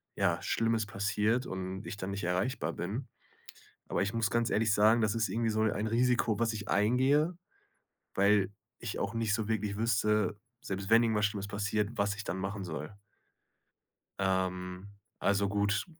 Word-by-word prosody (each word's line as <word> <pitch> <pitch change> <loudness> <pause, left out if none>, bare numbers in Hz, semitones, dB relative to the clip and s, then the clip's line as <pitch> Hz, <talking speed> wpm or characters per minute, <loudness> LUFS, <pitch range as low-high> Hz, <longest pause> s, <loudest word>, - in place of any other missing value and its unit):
ja, - - +1
Schlimmes 115 -1 +1
passiert 105 +4 0
und 95 +1 -5
ich 105 - -5
dann 100 -1 -4
nicht 100 -1 -4
erreichbar 90 -1 -1
bin? 110 +9 -4 0.8
Aber - - 0
ich 100 +1 -1
muss 115 -2 +1
ganz 115 +1 +1
ehrlich 110 0 +2
sagen. 110 +3 +5
Das 110 0 +1
ist 115 0 +1
irgendwie 115 0 0
so 110 0 0
ein 110 0 +1
Risiko, 120 -1 +2
was 115 -1 +2
ich 105 -1 -6
eingehe, 130 - +3 0.8
weil 100 -1 +4 0.3
ich 115 -3 -5
auch 100 +3 -2
nicht 115 -2 +1
so 110 -1 -1
wirklich 105 -2 -1
wüsste, 105 -2 +1 0.2
selbst 95 0 -4
wenn 115 +1 +7
irgendwas 110 -2 +2
Schlimmes 100 -2 -4
passiert, 105 +1 -1
was 100 0 +1
ich 105 0 -7
dann 95 - -3
machen 95 +1 -3
soll. 80 +2 -6 1.3
Ähm, 95 0 -1 0.3
also 100 0 +2
gut, 100 +1 +1
105 Hz, 165 wpm, -31 LUFS, 100-115 Hz, 1.3 s, wenn